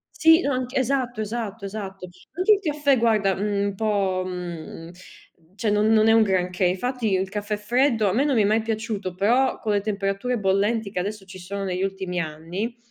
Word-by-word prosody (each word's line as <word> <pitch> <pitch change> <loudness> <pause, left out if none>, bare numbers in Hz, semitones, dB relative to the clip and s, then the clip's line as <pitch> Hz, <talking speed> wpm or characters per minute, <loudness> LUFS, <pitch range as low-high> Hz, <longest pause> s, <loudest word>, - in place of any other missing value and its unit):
Sì, 325 +1 +6
no 285 - 0
anc 255 0 -3
esatto, 255 -3 0
esatto, 215 -1 -4
esatto. 195 -2 -6 0.2
Anche 365 +6 +3
il - - -2
caffè 295 -6 +1
guarda, 215 -4 +2
mhmm, 200 0 -1
un 200 - -3
po', 195 -3 0
mhmm, 170 -2 -7 0.6
cioè 210 +2 -1
non 210 +1 +3
non 220 0 +5
è 225 - +6
un 225 - +6
granché, 185 -2 0
infatti 220 +4 0
il 190 0 +1
caffè 205 +1 -3
freddo 230 +1 +1
a 185 - 0
me 265 +5 +2
non 285 - +1
mi 225 - +4
è - - +1
mai 215 +2 +2
piaciuto 220 -4 -3
però, 240 +8 +2
con 215 - -1
le 205 - +2
temperature 200 +4 -2
bollenti 205 +2 +1
che 195 - -4
adesso 200 +2 -4
ci 190 0 -11
sono 195 +2 -5
negli 185 -1 -2
ultimi 190 -2 -3
anni, 170 +8 -4
210 Hz, 200 wpm, -24 LUFS, 190-235 Hz, 0.6 s, Sì